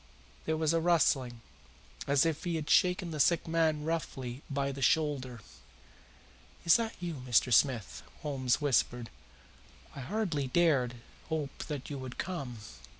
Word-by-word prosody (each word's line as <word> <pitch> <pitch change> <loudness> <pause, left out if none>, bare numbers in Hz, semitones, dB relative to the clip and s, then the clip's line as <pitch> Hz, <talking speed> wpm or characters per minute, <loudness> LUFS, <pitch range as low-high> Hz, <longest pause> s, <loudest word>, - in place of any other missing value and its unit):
There 160 0 0
was 160 0 +1
a 165 - +3
rustling, 140 -8 +2 0.7
as 140 +2 +4
if 160 -2 -1
he 175 -2 -1
had 155 -2 -3
shaken 180 -2 +3
the 155 - -5
sick 170 +4 +3
man 160 -2 +1
roughly 135 -6 -4
by 140 -1 -1
the 135 0 -7
shoulder. 130 -4 +1 1.2
"Is 170 - +7
that 230 -1 -3
you, 170 -6 -5
Mr. 120 +1 +3
Smith?" 120 -4 +2 0.2
Holmes 130 -4 0
whispered. 120 -4 0 0.8
"I - - -7
hardly 160 -2 -2
dared 135 -5 +2 0.3
hope 155 -4 -3
that 145 -2 -5
you 140 - -4
would 130 -1 -8
come." 140 -10 -4
145 Hz, 145 wpm, -31 LUFS, 130-165 Hz, 1.2 s, Is